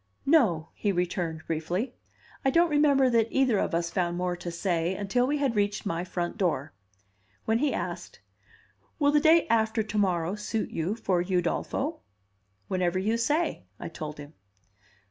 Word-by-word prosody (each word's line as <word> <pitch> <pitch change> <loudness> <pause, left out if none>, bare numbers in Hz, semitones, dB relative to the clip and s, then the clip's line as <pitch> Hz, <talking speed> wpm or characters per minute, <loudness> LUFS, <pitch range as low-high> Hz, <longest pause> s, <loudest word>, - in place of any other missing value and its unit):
"No," 215 - +3
he 205 - -1
returned 175 -3 -2
briefly. 175 +10 -2 0.5
I 270 - +3
don't 335 +3 +3
remember 285 -3 +4
that 230 -1 +3
either 260 -6 +2
of 165 - 0
us 170 0 -1
found 175 -2 -1
more 180 0 -1
to 175 0 -6
say 170 0 -1
until 205 +6 0
we 295 +2 +1
had 275 -5 0
reached 205 +1 0
my 170 -2 -1
front 175 +3 -4
door, 155 -6 0 0.7
when 225 +1 +2
he 290 +1 +2
asked, - - -5 0.8
"Will 285 -2 +3
the 295 - +4
day 320 +2 +5
after 220 0 +2
to 215 0 -5
morrow 180 -3 +1
suit 210 +1 -3
you 170 +6 -1
for 185 -6 0
Udolpho?" 180 -2 -1 0.7
"Whenever 185 -1 0
you 210 +5 +1
say," 290 - 0
I - - -5
told 155 -2 -7
him. 145 +1 -10
195 Hz, 165 wpm, -28 LUFS, 175-240 Hz, 0.8 s, day